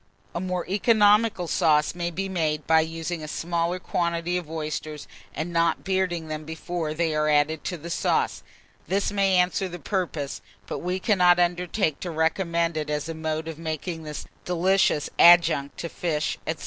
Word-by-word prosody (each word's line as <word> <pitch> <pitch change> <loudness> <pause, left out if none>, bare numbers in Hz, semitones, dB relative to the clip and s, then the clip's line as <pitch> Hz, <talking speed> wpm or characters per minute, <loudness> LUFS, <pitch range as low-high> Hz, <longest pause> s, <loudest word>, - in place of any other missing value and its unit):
A - - -2
more 180 -1 -3
economical 210 -1 +3
sauce 150 -2 +2
may 175 0 -2
be 195 +3 -3
made 155 -5 -1
by 160 0 +5
using 165 +1 -4
a 155 - -6
smaller 170 +2 -1
quantity 170 -1 -1
of 175 -4 -3
oysters, 155 -1 -5 0.3
and 165 +3 -4
not 165 -1 +1
bearding 185 -4 -1
them 155 0 -5
before 160 0 -4
they 165 -1 0
are 155 0 +1
added 150 +1 +2
to 180 - -3
the 170 +2 -8
sauce: - - 0 0.5
this 200 +2 0
may 195 -2 +2
answer 180 +1 +2
the 175 - -7
purpose, 165 -4 -3 0.2
but - - -5
we 180 +2 -2
cannot 180 -4 +4
undertake 175 -2 0
to 180 - -5
recommend 170 0 0
it 150 -1 -3
as 150 +1 -2
a 165 - -4
mode 160 0 -3
of 165 -1 -6
making 160 +1 -4
this 150 -2 -7 0.2
delicious 180 -3 +2
adjunct 170 -5 +6
to 170 - -4
fish, 160 -3 -2
&c. 160 - 0
170 Hz, 175 wpm, -25 LUFS, 155-180 Hz, 0.5 s, adjunct